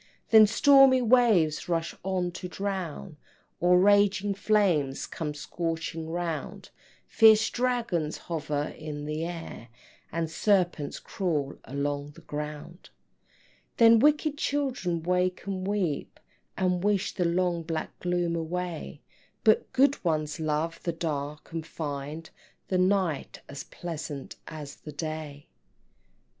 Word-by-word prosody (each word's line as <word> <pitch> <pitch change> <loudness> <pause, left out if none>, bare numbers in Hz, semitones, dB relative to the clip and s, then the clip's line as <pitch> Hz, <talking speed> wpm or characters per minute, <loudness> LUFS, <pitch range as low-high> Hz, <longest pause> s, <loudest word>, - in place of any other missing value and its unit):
Then 220 -1 +9
stormy 270 +2 +6
waves 215 -11 +3
rush 165 -1 -1
on 185 -2 -1
to 180 +1 -6
drown, 185 -4 -4 0.4
Or 180 +1 +5
raging 205 +1 +4
flames 190 -10 +1
come 150 -3 -5
scorching 165 +1 -4
round, 170 -1 -4 0.3
Fierce 220 0 +6
dragons 235 -11 -1
hover 150 -3 -3
in 150 -1 -6
the 155 +1 -3
air, 165 -8 -7 0.4
And 165 0 -1
serpents 175 -3 0
crawl 155 -8 -2
along 145 +1 -3
the 170 - -15
ground. 150 +3 -7 0.9
Then 230 -1 +7
wicked 300 +2 +2
children 250 - -1
wake 180 +1 0
and 190 -1 -3
weep, 190 -8 -2 0.4
And 180 -1 +1
wish 205 -2 +1
the 180 - -1
long 175 0 +1
black 160 -1 -5
gloom 175 -1 0
away; 165 -2 -4 0.4
But 215 - +3
good 280 +2 +3
ones 155 -3 -1
love 155 +1 -1
the 170 - -2
dark, 150 -3 -4
and 165 -1 -3
find 155 0 -5 0.4
The 185 - +1
night 185 -5 0
as 140 +1 -8
pleasant 155 -5 -7
as 150 -3 -8
the 150 - -10
day. 155 -1 -5
170 Hz, 120 wpm, -28 LUFS, 155-195 Hz, 0.9 s, Then